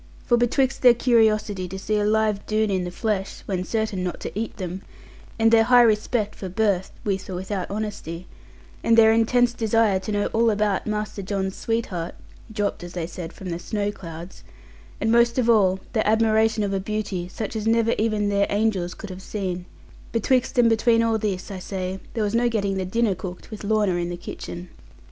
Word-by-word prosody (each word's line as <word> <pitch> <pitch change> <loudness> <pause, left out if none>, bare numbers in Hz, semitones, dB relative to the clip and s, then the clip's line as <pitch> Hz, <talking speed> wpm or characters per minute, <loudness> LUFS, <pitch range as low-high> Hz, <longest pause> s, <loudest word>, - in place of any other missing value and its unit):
For 240 - +4
betwixt 255 +3 +1
their 245 -2 +7
curiosity 215 -5 +2
to 190 +2 -6
see 210 +2 -1
a - - +1
live 215 -1 +1
Doone 215 -1 +1
in 185 -2 0
the - - -3
flesh 195 +1 -3
(when 185 -2 -2
certain 220 -2 -2
not 180 - -3
to - - -4
eat 220 +3 -4
them), 185 0 -5 0.6
and 225 0 +4
their 225 -1 +6
high 245 0 +7
respect 215 -1 +1
for 190 - -7
birth 190 -1 +1
(with 195 -2 -2
or 185 - -4
without 190 +1 -4
honesty), 200 -5 -5 0.6
and 230 0 +4
their 220 -1 +7
intense 235 +2 +3
desire 225 -3 +2
to 190 +3 -5
know 205 0 0
all 230 +1 +3
about 210 -2 0
Master 210 -1 -3
John's 190 0 -2
sweetheart 200 -7 -3 0.4
(dropped, 205 -4 -2
as 175 0 -8
they 175 -2 -3
said, 170 0 -7
from 185 -1 -7
the 170 - -3
snow 205 +2 -2
clouds), 170 -2 -10 0.6
and 225 - +1
most 235 +1 +4
of 250 -2 +2
all 190 -4 +3
their 220 -3 +1
admiration 220 0 +3
of 200 -1 -1
a 195 - 0
beauty 195 -3 -3
such 215 +3 -5
as 220 0 -2
never 230 0 +3
even 215 -2 +1
their 200 0 +2
angels 200 -4 0
could 205 -3 -8
have 185 +1 -8
seen 185 -3 -4 0.4
betwixt 250 +3 +1
and 240 -1 +6
between 230 0 +3
all 225 -1 +1
this, 200 -2 -3
I 190 - -5
say, 185 0 -4 0.2
there 225 - 0
was 205 0 -1
no 240 +1 +3
getting 200 -4 -1
the 190 - -2
dinner 225 +2 +1
cooked, 180 +2 -8
with 215 - -7
Lorna 210 -2 +2
in 175 0 -2
the 175 - -4
kitchen. 175 0 -8
210 Hz, 200 wpm, -24 LUFS, 190-225 Hz, 0.6 s, their